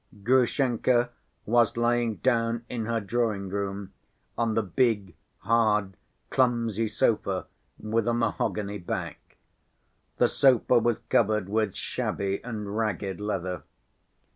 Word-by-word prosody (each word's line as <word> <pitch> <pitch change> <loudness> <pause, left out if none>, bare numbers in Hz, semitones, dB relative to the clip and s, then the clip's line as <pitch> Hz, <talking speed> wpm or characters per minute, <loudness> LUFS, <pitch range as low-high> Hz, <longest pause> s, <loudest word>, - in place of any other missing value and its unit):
Grushenka 125 0 +2 0.3
was 115 0 +3
lying 120 -1 +1
down 115 -1 0
in 115 -3 -4
her 115 -1 0
drawing‐room 100 -3 -2 0.4
on 115 -2 0
the 110 - +2
big, 100 -1 0 0.3
hard, 105 -4 +2 0.4
clumsy 115 -4 +1
sofa, 105 -3 0 0.3
with 110 +1 -1
a 120 - +2
mahogany 105 -3 -1
back. 85 - -6 0.8
The - - +4
sofa 125 -2 +4
was 115 -1 0
covered 105 -3 +2
with 105 -1 0
shabby 100 0 -2
and 105 -4 -5
ragged 105 -3 -2
leather. 95 -3 -3
110 Hz, 110 wpm, -27 LUFS, 100-120 Hz, 0.8 s, The